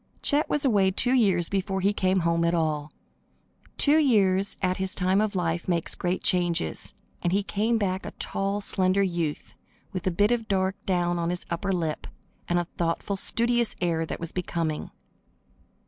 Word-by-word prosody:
Chet 290 +2 +2
was 295 -1 +1
away 200 -7 +4
two 245 +7 +2
years 195 -9 +3
before 195 0 -1
he 200 +2 +2
came 185 -1 +1
home 170 0 +1
at 170 +1 +2
all. 155 -2 -1 0.9
Two 300 +2 +5
years 200 -8 +2
at 185 -1 0
his 190 +1 -1
time 190 +2 +2
of 215 -1 -1
life 170 -1 -1
make 170 -3 -1
great 180 +1 -1
changes, 175 - 0 0.3
and 175 - 0
he 200 +2 +1
came 210 +5 0
back 190 -3 -1
a - - -5
tall, 195 +1 -2
slender 190 0 +2
youth, 170 -5 -3 0.4
with 185 -1 -3
a - - +5
bit 205 +5 +2
of 230 -2 0
dark 190 -1 0
down 175 -2 +1
on 170 0 -1
his 175 0 -3
upper 185 +4 -1
lip, 165 -4 -2 0.4
and 175 - +2
a 175 - 0
thoughtful, 170 +4 -1
studious 235 +4 +1
air 170 -2 0
that 160 - -5
was 165 -1 -3
becoming. 165 -3 -3
185 Hz, 180 wpm, -26 LUFS, 170-200 Hz, 0.9 s, Two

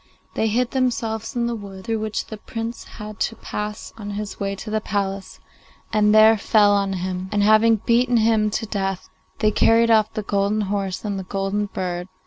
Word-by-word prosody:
They 220 - 0
hid 240 +3 0
themselves 230 -4 -1
in 240 -1 0
the 235 - -1
wood 195 -4 -8
through 225 -1 -1
which 215 0 -3
the 215 - -8
Prince 225 +2 -6
had 210 0 -8
to 225 - -1
pass 210 0 -6
on 205 -1 -6
his 210 -1 -6
way 200 0 -2
to 215 +2 -8
the 215 0 0
palace, 195 -1 -3 0.5
and 210 -1 +4
there 215 0 +6
fell 205 -1 +4
on 200 -1 +1
him, 185 0 -4
and, 205 -1 +1
having 215 +2 +5
beaten 240 +3 +2
him 220 -1 +3
to 220 - -2
death, 195 -3 -3 0.3
they 215 -1 +3
carried 230 +2 +4
off 215 -1 +4
the 215 - -2
golden 200 +2 0
horse 195 -1 -3
and 200 -2 -2
the - - -5
golden 195 +2 -2
bird. 180 -2 -4
210 Hz, 195 wpm, -22 LUFS, 200-225 Hz, 0.5 s, there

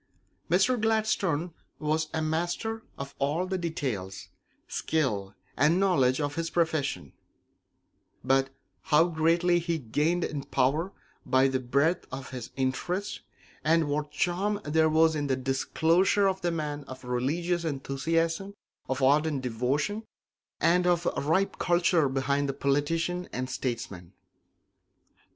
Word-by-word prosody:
Mr. 205 +8 +3
Gladstone 200 -7 +1 0.2
was 155 +1 0
a 160 - -1
master 175 +8 -2 0.2
of 140 0 -6
all 145 +6 0
the 190 0 -2
details, 115 - -4 0.4
skill, 105 -11 -1 0.2
and 155 +6 +3
knowledge 140 -10 +3
of 145 -1 -1
his 165 +1 -2
profession; 160 -4 -1 1.1
but 135 +1 +2 0.4
how 150 +2 +5
greatly 170 +1 +2
he 170 -1 -1
gained 155 +7 0
in 145 -2 -3
power 145 +9 +1 0.3
by 130 +1 +3
the 130 -1 0
breadth 140 +7 +1
of 130 0 -7
his 125 -3 -6
interests, 175 +9 -2 0.4
and 160 -1 +3
what 150 +1 -1
charm 190 +6 0
there 160 +1 +3
was 160 0 +4
in 145 -1 -1
the 130 - +1
disclosure 165 +9 +2
of 190 0 -1
the 175 - +1
man 150 -3 -3
of 130 0 -10
religious 155 +8 -1
enthusiasm, 165 +6 -1 0.3
of 130 0 -1
ardent 145 0 +3
devotion, 130 - -1 0.6
and 180 +1 +3
of 175 -1 +2
ripe 165 +7 0
culture 175 -4 +3
behind 140 +1 0
the - - -1
politician 165 +6 0
and 130 +1 -4
statesman! 105 -9 -4
155 Hz, 130 wpm, -28 LUFS, 135-175 Hz, 1.1 s, how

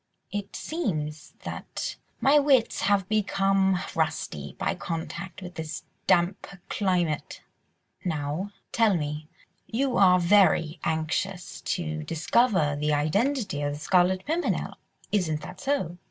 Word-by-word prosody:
It 205 -1 -4
seems 155 - -3
that - - -5 0.3
my 290 +2 +6
wits 275 -5 +3
have 200 -2 +2
become 195 -2 +2 0.2
rusty 150 - -2
by - - 0
contact 175 +2 -5
with 180 -1 -7
this 160 -1 -5 0.2
damp 175 +2 +2 0.2
climate. 175 -6 0 0.6
Now, 155 +3 -2 0.2
tell 225 -4 +4
me, 150 -1 -3 0.4
you 255 +2 0
are 185 -2 +6
very 170 -3 +4
anxious 170 +4 -2 0.2
to 155 -3 -3
discover 165 - +2
the 150 +1 0
identity 200 - 0
of 145 0 -1
the 145 - -6
Scarlet 185 +3 +3
Pimpernel, 330 +3 -1 0.4
isn't 160 -7 +1
that - - -9
so?" 230 - -1
180 Hz, 120 wpm, -27 LUFS, 155-205 Hz, 0.6 s, my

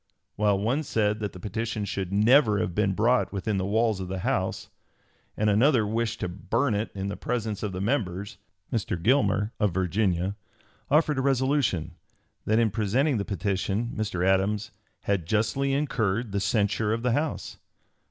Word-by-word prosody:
While 105 -1 +2
one 115 +9 0
said 105 -7 0
that 105 -3 -3
the 90 - -11
petition 110 +2 -3
should 95 -2 -3
never 110 +2 +5
have 90 - -1
been 100 0 +1
brought 120 +5 +2
within 100 +1 -2
the 95 0 -1
walls 110 0 +1
of 95 - -4
the 95 0 -4
House, - - -1 0.7
and 110 - +1
another 115 +3 +4
wished 115 +2 -2
to - - 0
burn 100 +8 -1
it 105 +2 -1
in 95 0 -3
the 100 - -3
presence 110 -4 -3
of 105 - -2
the 95 0 -4
members, 100 -5 -2 0.3
Mr. 100 -6 -1
Gilmer, 110 0 +2
of 105 -5 +1
Virginia, 95 0 0 0.5
offered 150 -1 +3
a - - +2
resolution, 130 - +1 0.5
that 110 - +2
in 115 -2 +3
presenting 120 +7 +1
the 100 - -2
petition 100 +4 -1
Mr. 100 -5 -1
Adams 100 +2 +1 0.3
"had 95 -5 -1
justly 115 +7 +1
incurred 115 -6 0
the 100 - 0
censure 105 +1 +1
of 115 +1 -3
the 125 - +2
House." 150 +5 -2
105 Hz, 170 wpm, -26 LUFS, 100-115 Hz, 0.7 s, never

